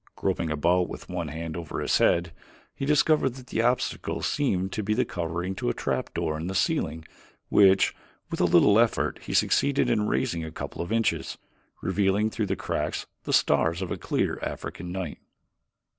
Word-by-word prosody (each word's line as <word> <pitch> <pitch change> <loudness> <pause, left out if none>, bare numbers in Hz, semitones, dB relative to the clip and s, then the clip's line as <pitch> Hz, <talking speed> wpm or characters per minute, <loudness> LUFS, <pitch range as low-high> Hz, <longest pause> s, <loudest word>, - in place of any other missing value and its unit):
Groping 80 - -1
about 85 +4 +2
with - - -9
one 90 -3 -3
hand 80 +1 -5
over 85 -3 -5
his - - +2
head 85 -1 +2 0.4
he 135 - -4
discovered 150 -3 +3
that 130 -1 -11
the 115 - -1
obstacle 125 +1 0
seemed 95 -10 0
to 110 - -2
be 105 +1 0
the 125 +2 +2
covering 85 0 -3
to 90 - -2
a - - -1
trap - - -2
door 80 -1 -1
in 80 - -4
the 95 - -4
ceiling 80 -3 0 0.4
which, 95 -1 +5 0.4
with - - -2
a - - +5
little 105 +2 +5
effort, 120 -1 +1
he - - -4
succeeded 140 -1 +3
in 105 0 +1
raising 95 -11 0
a 80 - -5
couple 80 - -6
of 85 - -5
inches, 115 0 0 0.5
revealing 100 +3 +1
through 110 -2 -2
the - - 0
cracks - - -2 0.2
the - - -2
stars 85 +1 +3
of 90 - -5
a - - 0
clear - - -1
African 90 +1 -5
night. 90 -4 -4
95 Hz, 185 wpm, -26 LUFS, 85-110 Hz, 0.5 s, which